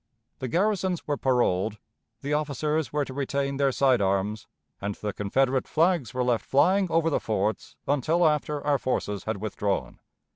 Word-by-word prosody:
The 130 Hz, -, -3 dB
garrisons 190 Hz, -, 0 dB
were 145 Hz, -, 0 dB
paroled, 115 Hz, -6 st, +1 dB, 0.4 s
the 145 Hz, +1 st, -2 dB
officers 150 Hz, +1 st, -1 dB
were 150 Hz, -1 st, 0 dB
to 130 Hz, -, -8 dB
retain 140 Hz, 0 st, -1 dB
their 140 Hz, -1 st, +2 dB
side 130 Hz, -3 st, +3 dB
arms, 100 Hz, +2 st, 0 dB, 0.3 s
and 100 Hz, 0 st, -3 dB
the 105 Hz, -1 st, -4 dB
Confederate 130 Hz, +6 st, +1 dB
flags 165 Hz, -5 st, +2 dB
were 130 Hz, -1 st, -1 dB
left 120 Hz, -2 st, +1 dB
flying 185 Hz, +7 st, +3 dB
over 165 Hz, 0 st, +2 dB
the -, -, +2 dB
forts 110 Hz, 0 st, -2 dB
until 155 Hz, +5 st, +3 dB
after 150 Hz, -1 st, -1 dB
our 145 Hz, -2 st, +2 dB
forces 105 Hz, -6 st, -2 dB
had 110 Hz, -1 st, -2 dB
withdrawn. 100 Hz, -, -2 dB
135 Hz, 160 wpm, -26 LUFS, 110-150 Hz, 0.4 s, side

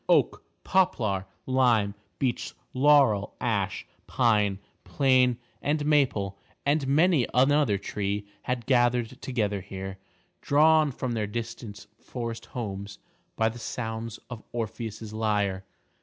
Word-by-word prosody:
Oak, -, -, +3 dB, 0.2 s
poplar, 110 Hz, -, +1 dB, 0.2 s
lime, 120 Hz, -6 st, +3 dB, 0.2 s
beech, 130 Hz, -3 st, -2 dB, 0.2 s
laurel, 130 Hz, -7 st, +4 dB
ash, -, -, -1 dB, 0.2 s
pine, 105 Hz, -5 st, +2 dB, 0.3 s
plane 130 Hz, -3 st, +3 dB, 0.2 s
and 145 Hz, +1 st, 0 dB
maple 120 Hz, -10 st, +1 dB, 0.3 s
and 145 Hz, -1 st, +2 dB
many 155 Hz, -1 st, +4 dB
another 135 Hz, -4 st, +4 dB
tree 100 Hz, +1 st, -3 dB, 0.2 s
had 125 Hz, -2 st, -3 dB
gathered 120 Hz, -1 st, +2 dB
together 105 Hz, -6 st, -1 dB
here, 95 Hz, 0 st, -7 dB, 0.4 s
drawn 155 Hz, +1 st, +4 dB
from 130 Hz, -1 st, -4 dB
their 110 Hz, -3 st, -1 dB
distant 115 Hz, -1 st, -6 dB
forest 115 Hz, -2 st, -6 dB
homes 100 Hz, -4 st, -5 dB, 0.4 s
by 110 Hz, -, +2 dB
the 115 Hz, +2 st, -4 dB
sounds 115 Hz, -1 st, -4 dB
of 120 Hz, -3 st, -8 dB
Orpheus's 110 Hz, -2 st, -5 dB
lyre. 105 Hz, -3 st, 0 dB
115 Hz, 110 wpm, -27 LUFS, 105-130 Hz, 0.4 s, laurel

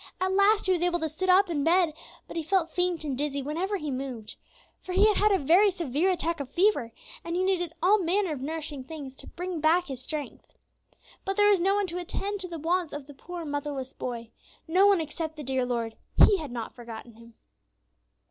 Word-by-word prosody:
At 375 Hz, 0 st, 0 dB
last, 405 Hz, +2 st, +4 dB
he 375 Hz, -, +2 dB
was 355 Hz, -2 st, +1 dB
able 350 Hz, 0 st, +1 dB
to 320 Hz, -, 0 dB
sit 345 Hz, +5 st, -3 dB
up 385 Hz, +2 st, +6 dB
in 310 Hz, -5 st, -1 dB
bed, 335 Hz, 0 st, +3 dB, 0.3 s
but -, -, -9 dB
he 330 Hz, -, -1 dB
felt 340 Hz, +1 st, +1 dB
faint 355 Hz, -3 st, 0 dB
and 285 Hz, -3 st, -2 dB
dizzy 280 Hz, 0 st, -2 dB
whenever 350 Hz, +8 st, -2 dB
he 300 Hz, -5 st, -4 dB
moved. 255 Hz, -4 st, -5 dB, 0.5 s
For 365 Hz, -, -6 dB
he 395 Hz, +3 st, +5 dB
had 425 Hz, -1 st, +4 dB
had 425 Hz, +1 st, +4 dB
a 390 Hz, -, +4 dB
very 355 Hz, +7 st, +5 dB
severe 340 Hz, -2 st, 0 dB
attack 335 Hz, -2 st, -1 dB
of 280 Hz, -3 st, -5 dB
fever, 345 Hz, -, +2 dB, 0.3 s
and 335 Hz, 0 st, -3 dB
he 365 Hz, -, +1 dB
needed 355 Hz, -3 st, 0 dB
all 410 Hz, +4 st, +5 dB
manner 370 Hz, 0 st, +1 dB
of 270 Hz, -, -6 dB
nourishing 300 Hz, -1 st, -5 dB
things 275 Hz, -2 st, -8 dB
to -, -, -12 dB
bring 355 Hz, -2 st, -5 dB
back 335 Hz, +3 st, +4 dB
his 260 Hz, -2 st, -5 dB
strength. 295 Hz, +2 st, -6 dB, 0.7 s
But 390 Hz, 0 st, -3 dB
there 415 Hz, 0 st, +6 dB
was 400 Hz, -3 st, +4 dB
no 385 Hz, +3 st, +2 dB
one 410 Hz, -1 st, +1 dB
to 360 Hz, 0 st, -4 dB
attend 400 Hz, +3 st, -3 dB
to 370 Hz, -, -4 dB
the 340 Hz, -2 st, -6 dB
wants 335 Hz, +1 st, 0 dB
of 290 Hz, -1 st, -6 dB
the 290 Hz, -, -12 dB
poor 345 Hz, +4 st, -8 dB
motherless 285 Hz, -2 st, -4 dB
boy. 235 Hz, -2 st, -6 dB, 0.4 s
No 370 Hz, +5 st, +5 dB
one, 400 Hz, -3 st, +5 dB
except 315 Hz, +1 st, -5 dB
the 300 Hz, -, -7 dB
dear 260 Hz, -1 st, 0 dB
Lord; 230 Hz, -2 st, -2 dB, 0.2 s
He 405 Hz, -, +7 dB
had 295 Hz, -5 st, -6 dB
not 235 Hz, -2 st, -5 dB
forgotten 235 Hz, -1 st, -10 dB
him. 230 Hz, +1 st, -16 dB
330 Hz, 225 wpm, -27 LUFS, 280-370 Hz, 0.7 s, He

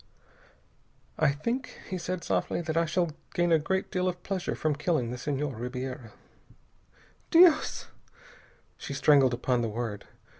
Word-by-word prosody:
"I 155 Hz, -, +4 dB
think," 235 Hz, -, -4 dB
he 185 Hz, -, -4 dB
said 180 Hz, 0 st, -4 dB
softly, -, -, -1 dB
"that 160 Hz, -1 st, -3 dB
I 165 Hz, 0 st, +3 dB
shall 170 Hz, 0 st, 0 dB, 0.2 s
gain 175 Hz, -1 st, +2 dB
a 165 Hz, -, +5 dB
great 190 Hz, +5 st, -2 dB
deal 185 Hz, 0 st, 0 dB
of 180 Hz, -1 st, -3 dB
pleasure 190 Hz, -2 st, -2 dB
from 155 Hz, -1 st, 0 dB
killing 150 Hz, -6 st, 0 dB
the 125 Hz, -, -4 dB
Senhor 145 Hz, 0 st, -2 dB
Ribiera." 125 Hz, 0 st, -6 dB, 1.2 s
"Dios 335 Hz, -1 st, +5 dB, 0.5 s
" -, -, -29 dB
She 140 Hz, -, -5 dB
strangled 135 Hz, -3 st, +5 dB
upon 125 Hz, 0 st, 0 dB
the 115 Hz, -, -1 dB
word. 110 Hz, -2 st, -4 dB
155 Hz, 150 wpm, -28 LUFS, 125-180 Hz, 1.2 s, a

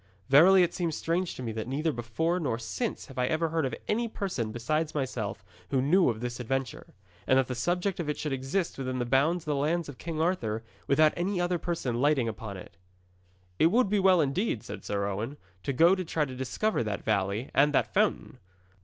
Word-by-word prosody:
'Verily 180 Hz, +7 st, +7 dB
it 175 Hz, -, 0 dB
seems 170 Hz, -4 st, -1 dB
strange 170 Hz, +2 st, -1 dB
to 130 Hz, -, -7 dB
me 115 Hz, -, -3 dB
that 110 Hz, +1 st, -4 dB
neither 150 Hz, +5 st, 0 dB
before 150 Hz, +9 st, -1 dB
nor 130 Hz, -9 st, -1 dB
since 160 Hz, -, -4 dB
have 135 Hz, -2 st, -8 dB
I 125 Hz, -, +2 dB
ever 160 Hz, +2 st, 0 dB
heard 160 Hz, -3 st, 0 dB
of 125 Hz, -, -4 dB
any 230 Hz, +2 st, 0 dB
person 175 Hz, -, -3 dB
besides 155 Hz, +8 st, -1 dB
myself 125 Hz, -7 st, -3 dB, 0.2 s
who 135 Hz, -, +1 dB
knew 165 Hz, +7 st, +4 dB
of 110 Hz, -1 st, -3 dB
this 120 Hz, 0 st, -4 dB
adventure, 130 Hz, 0 st, -4 dB, 0.3 s
and 130 Hz, -, +5 dB
that 135 Hz, -, +3 dB
the 125 Hz, -, -4 dB
subject 175 Hz, +9 st, -1 dB
of 160 Hz, -3 st, -2 dB
it 150 Hz, -, -1 dB
should 150 Hz, -3 st, -3 dB
exist 135 Hz, +6 st, -2 dB
within 130 Hz, -1 st, -2 dB
the 120 Hz, -, -1 dB
bounds 145 Hz, +7 st, +2 dB
of 150 Hz, -, -1 dB
the -, -, -1 dB
lands 160 Hz, +4 st, 0 dB
of 145 Hz, -3 st, -10 dB
King 165 Hz, -2 st, -4 dB
Arthur, 120 Hz, -11 st, 0 dB, 0.2 s
without 155 Hz, +2 st, +4 dB
any 180 Hz, +2 st, -1 dB
other 175 Hz, 0 st, 0 dB
person 130 Hz, -9 st, -2 dB
lighting 140 Hz, -4 st, +3 dB
upon 105 Hz, -2 st, -5 dB
it.' 90 Hz, -, -12 dB, 0.8 s
'It 160 Hz, -, +6 dB
would 225 Hz, +4 st, +3 dB
be 205 Hz, 0 st, +2 dB
well, 185 Hz, -3 st, +5 dB
indeed,' 145 Hz, -, -1 dB
said -, -, -8 dB
Sir 100 Hz, -1 st, -1 dB
Owen, 110 Hz, +8 st, -3 dB, 0.2 s
'to 140 Hz, -, -2 dB
go 165 Hz, +7 st, +5 dB
to 185 Hz, -1 st, -1 dB
try 160 Hz, -2 st, 0 dB
to 130 Hz, -2 st, -8 dB
discover 130 Hz, -, -1 dB
that 105 Hz, -3 st, -3 dB
valley 105 Hz, +3 st, -1 dB
and 145 Hz, +2 st, +4 dB
that 145 Hz, -, +1 dB
fountain.' -, -, 0 dB
145 Hz, 215 wpm, -28 LUFS, 120-170 Hz, 0.8 s, Verily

